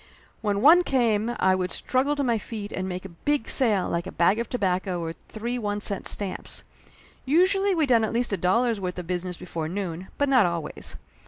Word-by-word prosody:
When 205 -2 -1
one 335 +5 +8
came 235 -5 +1
I 190 - +3
would 185 -1 -1
struggle 270 +3 0
to 285 - -1
my 235 -4 +1
feet 210 -2 -7
and 190 0 -3
make 185 +1 -5
a - - -7
big 275 - -2
sale 215 -8 +4
like 170 +2 -2
a - - -6
bag 185 +6 +2
of 235 - -3
tobacco 185 -5 -1
or 165 -1 -4 0.2
three 235 +3 -4
one 205 -2 -2
cent 205 -1 -2
stamps. 200 -2 -1 0.6
Usually 375 +7 +3
we 320 -3 +2
done 235 -4 +3
at 220 - -1
least 240 -2 -1
a - - +1
dollar's 220 +5 +1
worth 180 -1 -4
of 180 - -5
business 180 0 -4
before 165 -3 -5
noon, 185 -1 -4
but 285 - +1
not 255 -8 +4
always. 170 -3 -5
205 Hz, 210 wpm, -25 LUFS, 180-245 Hz, 0.6 s, one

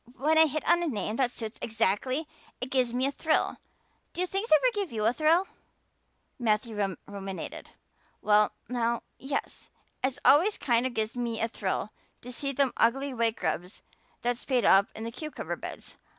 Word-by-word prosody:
When 310 +5 +3
I 320 - +8
hit 310 +1 -3
on 345 - +5
a 345 - 0
name 215 - -2
that 260 -3 +2
suits 225 -2 -7
exactly 230 +7 0 0.3
it 250 +2 -5
gives 255 -3 +2
me 250 +2 +1
a 275 - +1
thrill. 310 +2 +1 0.6
Do 360 - 0
things 390 +5 -2
ever - - +6
give 405 -4 -2
you 215 -2 -1
a 230 - +4
thrill?" 320 +6 +3 0.9
Matthew 220 -1 0 0.3
ruminated. 195 -2 -7 0.5
"Well 210 0 +4 0.2
now, 235 0 -1 0.2
yes. 275 +1 -4 0.3
It 260 0 0
always 355 +9 +6
kind 240 0 +2
of 255 - -8
gives 220 +2 -1
me 235 -2 -2
a 225 - +1
thrill 210 -1 -3 0.3
to 250 - -7
see 275 +3 -2
them 275 -1 +1
ugly 270 +4 +2
white 230 -2 +1
grubs 180 +2 -3 0.4
that 245 0 +1
spade 250 -4 0
up 195 +1 +6
in 220 - -6
the 230 - -4
cucumber 305 +5 -5
beds. - - -9
245 Hz, 175 wpm, -28 LUFS, 225-285 Hz, 0.9 s, I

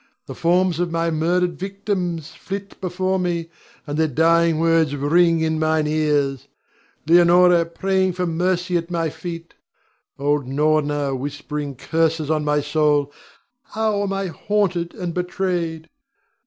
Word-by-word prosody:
The - - -7
forms 175 0 +1
of 175 -1 0
my 165 0 -1
murdered 175 +2 0
victims 185 -5 -3
flit 200 +1 -7
before 185 +1 -1
me, 170 -2 -2 0.3
and 145 0 -3
their 160 - +3
dying 165 +3 +3
words 165 -3 +2
ring 165 +4 +3
in 160 0 0
mine 155 -1 +1
ears, 150 -4 0 0.6
Leonore 175 +1 +5
praying 190 +2 0
for 180 +1 -2
mercy 180 +1 0
at 170 0 -4
my 165 -3 -1
feet; 170 0 -8 0.6
old 145 -1 0
Norna 145 0 +1
whispering 145 +1 -5
curses 160 +2 0
on 155 -1 +1
my 150 0 +1
soul. 145 -1 +1 0.5
How 215 -4 -1
am 200 -1 -2
I 195 0 -2
haunted 180 -2 -1
and 175 -2 -4
betrayed! 175 -3 -2
165 Hz, 135 wpm, -21 LUFS, 150-180 Hz, 0.6 s, Leonore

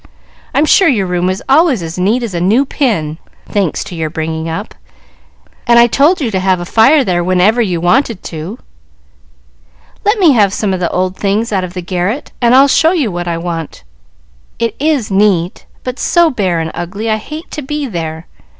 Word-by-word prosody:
I'm 295 - +3
sure 380 +4 +4
your 225 -10 +2
room 180 0 -1
is 185 +1 -3
always 275 - +3
as 165 +2 -6
neat 220 +7 +1
as 225 -5 -4
a 170 - -2
new 220 +10 +3
pin, 175 - -1 0.3
thanks 195 -6 -1
to - - -10
your 160 -2 -3
bringing 160 0 -4
up, 200 +6 -5 0.9
and 235 0 +5
I 235 - +7
told 285 +9 +3
you 250 -7 -2
to 190 - 0
have 185 -1 +1
a 175 - -5
fire 265 - +4
there 175 -4 0
whenever 185 +6 +2
you 180 -6 -1
wanted 220 +4 +1
to." 165 +7 -7 1.5
"Let 415 +3 +2
me 355 -7 +5
have 205 -6 +3
some 205 -3 -1
old 185 +1 -1
things 210 +3 -1
out 190 -2 0
of 180 0 -7
the 180 - -5
garret, 185 +8 -3
and 240 +1 +4
I'll 270 +2 +6
show 320 +5 +3
you 285 - 0
what 175 0 -4
I 170 -1 -1
want. 165 - -5 0.7
It 230 -2 -2
is 285 -8 0
neat, 190 -3 +1 0.2
but 255 +1 -5
so 340 -2 +3
bare 190 -9 -1
and 160 0 -3
ugly 185 +6 -5
I 215 -1 +1
hate 305 +9 -9
to 305 - -5
be 295 +1 -4
there. 165 -7 -5
200 Hz, 195 wpm, -14 LUFS, 175-255 Hz, 1.5 s, I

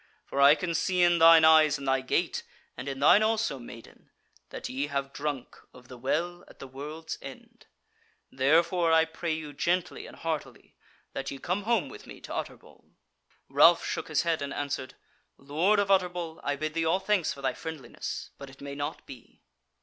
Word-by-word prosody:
For 140 - -2
I 140 +2 +8
can 175 0 -3
see 180 +2 +1
in 175 -1 +4
thine 165 -1 +8
eyes 155 -2 +6
and 140 0 -8
thy 135 0 +2
gait, 130 - -1 0.3
and 140 - -6
in 135 -1 -5
thine 175 +8 +6
also, 220 -10 0
maiden, 120 -1 -13 0.4
that - - -6
ye 135 +3 -3
have 140 -1 -3
drunk 145 -3 -4 0.2
of 125 -1 -16
the 125 - -10
Well 175 +7 -2
at - - -17
the - - -9
World's 150 +5 -7
End. - - -12 0.6
Therefore 165 +5 +2
I 160 0 +5
pray 160 +1 -4
you 155 -2 -6
gently 175 +5 -1
and - - -13
heartily 160 -2 -5 0.4
that 135 0 -4
ye 140 - -6
come 185 +8 -3
home 235 0 +1
with 425 +1 -12
me - - -11
to - - -8
Utterbol." - - -8 0.6
Ralph - - +5
shook - - -3
his - - +1
head, 165 -3 0
and 140 -1 -4
answered: 140 -2 -4 0.4
"Lord 160 +10 +1
of 200 -1 +1
Utterbol, 175 -3 0
I 145 0 -1
bid 155 +2 -4
thee 165 0 0
all 165 +4 +2
thanks 195 -4 +1
for 140 0 -9
thy 130 - +1
friendliness, 160 -4 -7
but 140 -1 -9
it 135 - -16
may 140 0 -7
not 145 +3 -5
be." 130 -4 -14
155 Hz, 190 wpm, -28 LUFS, 140-170 Hz, 0.6 s, I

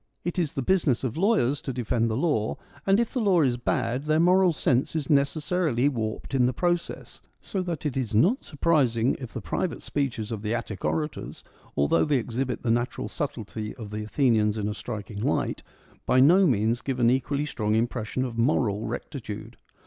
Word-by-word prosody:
It 175 +1 -1
is 160 -5 -1
the 135 - -2
business 155 -8 +2
of 125 -3 -2
lawyers 165 - +2
to 135 - -4
defend 115 -1 0
the 110 - -1
law, 135 -9 0 0.3
and, 195 +2 +5
if 235 - 0
the 255 - 0
law 190 -5 +4
is 125 -3 +1
bad, 125 +1 -1
their 155 +1 +2
moral 180 +2 +5
sense 135 -2 0
is 155 -3 -1
necessarily 145 -1 +2
warped 110 -1 -4
in 125 -2 +4
the 130 - 0
process; 175 +4 -2 0.2
so 195 - -3
that 170 -4 -4
it 145 - -1
is 120 -5 -2
not 190 - +3
surprising 135 -7 +2
if 125 -4 -7
the 120 - -5
private 170 - -3
speeches 120 -6 -2
of 110 -3 -4
the 110 +2 -1
Attic 110 -4 -5
orators, 155 -1 -3 0.3
although 70 +3 +3
they 140 - +2
exhibit 125 +2 -3
the 115 - +1
natural 120 +2 -1
subtlety 115 -8 -5
of 110 -5 -8
the 105 0 -4
Athenians 110 -3 +2
in 105 -1 -1
a 105 - -2
striking 105 -2 -6
light, - - 0 0.5
by 130 - +4
no 175 +8 +6
means 115 -1 +1
give 130 -2 -3
an 120 0 +5
equally 140 +3 0
strong 110 -7 -1
impression 120 +2 -1
of 115 -2 -5
moral 115 -4 +1
rectitude. - - -6
130 Hz, 190 wpm, -26 LUFS, 115-155 Hz, 0.5 s, no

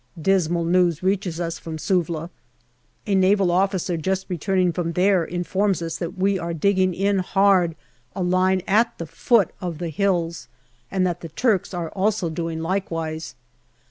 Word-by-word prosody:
Dismal 170 -1 +1
news 175 -1 +2
reaches 185 -3 0
us 170 -1 -3
from 160 -1 -6
Suvla. 170 -1 -1 0.7
A 205 - -1
Naval 190 -1 +3
officer 185 -1 +1
just 190 +4 -1
returning 180 0 +1
from 170 -1 -2
there 185 0 +3
informs 185 +3 -1
us 165 -1 -4
that 175 +2 -5
we 195 +1 +1
are 170 -1 -3
digging 185 +1 +2
in 200 +1 +1
hard 185 -3 +3 0.4
a 190 - -2
line 185 +1 +2
at 230 +4 +2
the 165 - -5
foot 200 +5 +2
of 175 -3 -4
the 170 0 -4
hills, 170 -1 -1 0.4
and 190 -1 +1
that 175 -1 -2
the 165 - -7
Turks 210 - 0
are 175 -3 -4
also 200 -3 0
doing 165 0 -3
likewise. 165 -3 -3
180 Hz, 160 wpm, -23 LUFS, 165-195 Hz, 0.7 s, Naval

